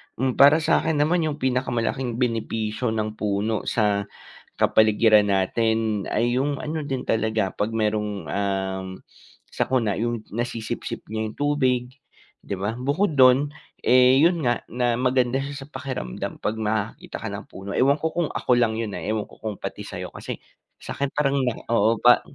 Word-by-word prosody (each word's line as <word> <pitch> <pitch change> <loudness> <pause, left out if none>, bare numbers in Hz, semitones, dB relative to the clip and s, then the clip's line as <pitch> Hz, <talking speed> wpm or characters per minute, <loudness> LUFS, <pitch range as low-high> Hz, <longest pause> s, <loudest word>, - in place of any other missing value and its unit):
Hmm, 130 +1 -1
para 145 +3 +7
sa'kin 160 0 +2
naman, 165 +2 +2
yung 150 - -2
pinakamalaking 125 -1 -1
benepisyo 115 -1 -1
ng 110 0 -3
puno 105 +1 -1
sa 105 -3 +1 0.5
kapaligiran 110 -1 +4
natin, 110 +1 +1
ay 120 +3 +1
yung 140 +1 -1
ano 155 -1 -3
din 135 -2 -2
talaga, 110 -3 0
'pag 105 +2 -2
merong, 105 -5 -1
um, 95 0 -2 0.6
sakuna, 115 -6 0
yung 120 +1 -1
nasisipsip 115 0 -4
niya 110 0 -2
yung - - -13
tubig 130 -4 +1 0.6
'di - - -4
ba? 105 +4 -2
Bukod 145 +5 0
dun, 130 +3 +6 0.3
eh, 125 +2 +5
'yon 170 +1 +3
nga, 120 -1 +1
na, 120 0 0
maganda 125 +1 +1
siya 140 0 -6
sa - - -19
pakiramdam 130 - -5
'pag 105 - -2
nakakita 105 0 -3
ka - - -4
ng - - -6
puno. 95 +1 -9
Ewan 140 +2 +3
ko 160 +1 -2
kung 170 -3 0
ako - - -2
lang 115 -2 +2
'yon 110 -3 -3
ah, - - -6
ewan 110 -1 -1
ko - - -16
kung 105 -3 -4
pati - - -6
sa'yo - - -7
kasi, - - -6 0.4
sa'kin 140 0 -3
parang 140 -2 +1
na 125 -2 +1 0.2
oo, 115 +1 +3
pa 120 0 +6
120 Hz, 165 wpm, -24 LUFS, 110-135 Hz, 0.6 s, para